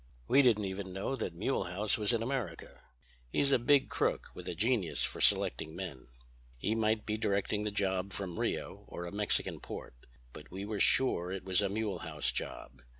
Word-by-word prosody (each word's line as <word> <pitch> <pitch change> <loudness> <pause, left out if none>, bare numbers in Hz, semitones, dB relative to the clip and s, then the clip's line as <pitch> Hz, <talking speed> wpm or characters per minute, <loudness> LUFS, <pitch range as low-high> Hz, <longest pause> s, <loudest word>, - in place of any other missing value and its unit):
"We 140 - +6
didn't 110 -6 +4
even 95 -1 -4
know 100 +8 -2
that 90 -7 -3
Mulehaus 100 -1 0
was 105 +1 +1
in 115 -1 +1
America. 130 -2 -4 0.5
He's 140 - +2
a 130 - +5
big 135 +3 +4
crook - - 0
with - - -9
a - - -3
genius 110 -5 +1
for - - -3
selecting 80 +6 +3
men. 75 -11 -6 0.5
He 105 - 0
might 110 -1 +1
be 105 0 -1
directing 100 0 0
the - - +1
job 95 -2 0
from 95 -3 -4
Rio - - -2
or 85 - -6
a 85 - -6
Mexican 105 0 0
port. - - -7 0.4
But - - -11
we 95 +2 -5
were 105 -1 -3
sure 90 -10 +4
it 95 -1 -4
was 95 0 +3
a 100 - +1
Mulehaus' 100 -7 -1
job. 65 0 -6
100 Hz, 185 wpm, -33 LUFS, 90-110 Hz, 0.5 s, We